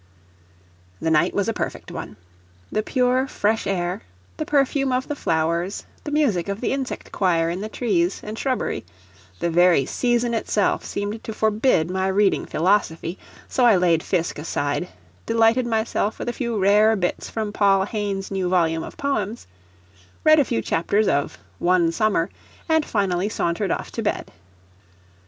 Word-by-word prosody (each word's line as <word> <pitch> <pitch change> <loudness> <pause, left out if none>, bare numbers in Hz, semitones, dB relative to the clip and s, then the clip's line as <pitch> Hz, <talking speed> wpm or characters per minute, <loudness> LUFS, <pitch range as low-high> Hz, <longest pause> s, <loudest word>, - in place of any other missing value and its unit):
The 160 - 0
night 155 - +3
was 200 0 +1
a 225 - 0
perfect - - -5
one. - - -7 0.5
The 215 - +1
pure 255 +3 +1
fresh 220 -2 0
air, 180 -1 -1 0.4
the 310 - -3
perfume 275 -1 +2
of 255 +1 0
the 295 - -3
flowers, 170 - -1 0.2
the - - -3
music 230 - +1
of 200 +1 -3
the 245 - -1
insect 270 -1 -4
choir 170 -3 +1
in 180 +3 -4
the 215 - -4
trees 195 -6 0
and 215 +1 -6
shrubbery 255 +2 -2 0.6
the 170 - 0
very 175 -4 +4
season 240 - 0
itself 215 -2 0
seemed 205 +2 -4
to 220 - -5
forbid 215 -6 +2
my 190 0 0
reading 195 +1 +2
philosophy, 170 -1 0 0.3
so 255 - 0
I 235 -4 +7
laid 175 -3 +3
Fiske 170 -4 -1
aside, 145 +1 -2 0.4
delighted 230 +2 +3
myself 220 -1 0
with - - -6
a - - -2
few 235 -3 -2
rare 210 +3 +4
bits 180 -3 -2
from 215 -2 -3
Paul 195 -2 +3
Hayne's 200 -2 -3
new 190 -2 -1
volume 165 -3 +2
of - - -9
poems, 235 -6 -2 0.8
read 310 0 +6
a 285 - +4
few 115 - -1
chapters 200 +6 +1
of 145 -6 0 0.2
"One 175 -2 +3
Summer," 200 -3 +1 0.4
and 320 -1 +3
finally 195 -5 0
sauntered 190 -1 -1
off - - -3
to - - -4
bed. - - -2
205 Hz, 160 wpm, -23 LUFS, 175-230 Hz, 0.8 s, I